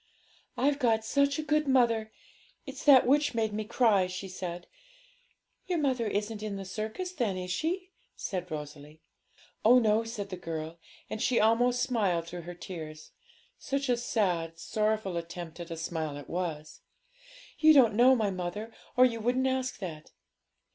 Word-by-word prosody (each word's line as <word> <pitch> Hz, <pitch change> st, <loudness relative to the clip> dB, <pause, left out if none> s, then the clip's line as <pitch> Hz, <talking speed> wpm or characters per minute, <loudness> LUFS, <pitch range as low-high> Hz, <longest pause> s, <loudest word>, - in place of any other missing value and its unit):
'I've 285 Hz, +1 st, +2 dB
got 225 Hz, -4 st, +2 dB
such 280 Hz, +4 st, +2 dB
a 310 Hz, -, -2 dB
good 305 Hz, 0 st, +1 dB
mother; 230 Hz, -4 st, +2 dB, 0.5 s
it's 270 Hz, -1 st, -8 dB
that 275 Hz, -4 st, +8 dB
which 290 Hz, +1 st, +3 dB
made 220 Hz, -2 st, 0 dB
me 215 Hz, +1 st, -2 dB
cry,' 215 Hz, -4 st, +3 dB
she 185 Hz, +2 st, -6 dB
said. 180 Hz, -2 st, -6 dB, 1.0 s
'Your 360 Hz, -2 st, 0 dB
mother 260 Hz, -6 st, 0 dB
isn't 210 Hz, +1 st, -2 dB
in 210 Hz, -2 st, -4 dB
the 195 Hz, 0 st, -6 dB
circus, 220 Hz, -, -4 dB
then, 235 Hz, -, -1 dB
is 180 Hz, 0 st, -4 dB
she?' 360 Hz, -, -2 dB, 0.2 s
said 180 Hz, -2 st, -4 dB
Rosalie. 150 Hz, 0 st, -8 dB, 0.6 s
'Oh 240 Hz, +3 st, +7 dB
no,' 220 Hz, -2 st, +3 dB
said 220 Hz, -3 st, -6 dB
the 185 Hz, -, -4 dB
girl; 165 Hz, -1 st, -6 dB, 0.3 s
and 215 Hz, -, -5 dB
she 245 Hz, -, +2 dB
almost 240 Hz, +3 st, +3 dB
smiled 195 Hz, -9 st, 0 dB
through 175 Hz, +1 st, -7 dB
her 175 Hz, -, -7 dB
tears 155 Hz, -4 st, -8 dB, 0.5 s
such 275 Hz, -1 st, -2 dB
a 245 Hz, -, +4 dB
sad, 180 Hz, -9 st, -1 dB
sorrowful 215 Hz, -2 st, -1 dB
attempt 170 Hz, 0 st, -7 dB
at 170 Hz, 0 st, -7 dB
a 165 Hz, -, -5 dB
smile 160 Hz, -3 st, -3 dB
it 145 Hz, -, -10 dB
was; 165 Hz, -4 st, -4 dB, 0.8 s
'you 315 Hz, 0 st, +7 dB
don't 255 Hz, -7 st, +6 dB
know 250 Hz, +4 st, +6 dB
my 215 Hz, -4 st, 0 dB
mother 185 Hz, +5 st, -5 dB, 0.2 s
or 255 Hz, -, +8 dB
you 230 Hz, -2 st, 0 dB
wouldn't 250 Hz, +4 st, +1 dB
ask 260 Hz, -1 st, -1 dB
that! 160 Hz, -6 st, -8 dB
215 Hz, 165 wpm, -29 LUFS, 175-250 Hz, 1.0 s, that